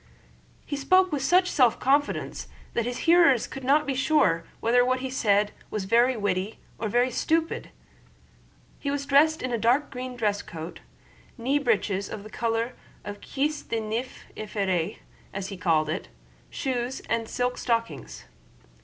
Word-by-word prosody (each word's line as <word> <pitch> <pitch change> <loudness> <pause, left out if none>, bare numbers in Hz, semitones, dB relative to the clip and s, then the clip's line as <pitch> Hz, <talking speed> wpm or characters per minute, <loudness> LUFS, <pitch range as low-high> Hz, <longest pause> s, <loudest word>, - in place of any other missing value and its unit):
He 285 - -3
spoke 370 +6 +3
with 290 -2 -1
such 360 +7 +4
self 250 -8 +3
confidence 285 +2 0 0.3
that 235 0 0
his 245 0 -4
hearers 330 -8 +5
could 270 - -8
not 290 +4 +3
be 275 - -1
sure 255 - +2
whether 245 +2 +4
what 255 +1 +1
he 260 -1 -4
said 210 -4 +2 0.2
was 210 -3 -3
very 240 +4 +3
witty 200 0 -1 0.2
or 225 - -1
very 245 +4 +2
stupid. 325 +6 0 1.1
He 280 - -3
was 280 0 -2
dressed 295 +2 +4
in 255 - -2
a 235 - 0
dark 245 +7 +2
green 255 0 -5
dress 210 -4 0
coat, 165 +1 -8 0.6
knee 265 +5 +1
breeches 205 -6 0
of 205 - -6
the 215 - -11
color 230 +1 -1 0.3
of 205 0 -7
cuisse 295 +2 -1
de 230 - -3
nymphe 225 +4 -4
effrayée, 195 -6 -1 0.4
as 195 0 -3
he 195 - -6
called 165 -5 +2
it, 155 - -3 0.4
shoes, 255 -1 -2
and 230 -1 -2
silk 250 0 -1
stockings. 230 -1 -2
245 Hz, 160 wpm, -26 LUFS, 210-275 Hz, 1.1 s, hearers